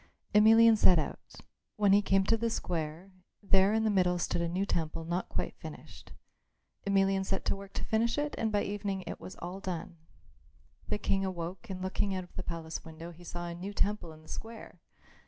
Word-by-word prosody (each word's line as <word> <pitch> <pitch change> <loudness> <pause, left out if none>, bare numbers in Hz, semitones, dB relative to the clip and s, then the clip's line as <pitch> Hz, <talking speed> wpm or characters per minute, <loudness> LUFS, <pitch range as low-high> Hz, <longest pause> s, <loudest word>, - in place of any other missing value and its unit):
Emelian 225 +2 +8
set 185 -4 +6
out. 155 - -4 0.3
When 205 -2 +4
he 205 - +6
came 195 -1 +3
to 225 - +3
the 230 +1 0
square, 170 -2 -3 0.3
there 195 0 +4
in 220 0 +2
the 220 - +3
middle 180 -2 +3
stood 175 - -1
a 170 - 0
new 185 +3 0
temple 165 -3 -2
not 175 +3 -2
quite - - -2
finished. - - -10 0.8
Emelian 195 -1 +3
set 190 0 -2
to - - +1
work 195 0 -10
to - - -3
finish 230 +3 +1
it 295 0 -1
and 220 -1 0
by 205 -1 +2
the - - -3
evening 200 -2 -2
it - - -6
was 185 - -9
all 180 +3 -6
done. 175 -2 -5 0.9
The - - +1
King 195 -1 0
awoke 185 +2 -4
and 185 -1 -4
looking 190 +1 0
out 185 - -3
of 180 - -17
the - - -3
palace 165 -2 -5
window 165 +1 -9
he 175 +1 -14
saw 175 0 -5
a 170 - -4
new 185 +4 -6
temple 205 -4 0
in 155 0 -14
the - - -18
square. 225 0 -8
190 Hz, 210 wpm, -31 LUFS, 175-205 Hz, 0.9 s, Emelian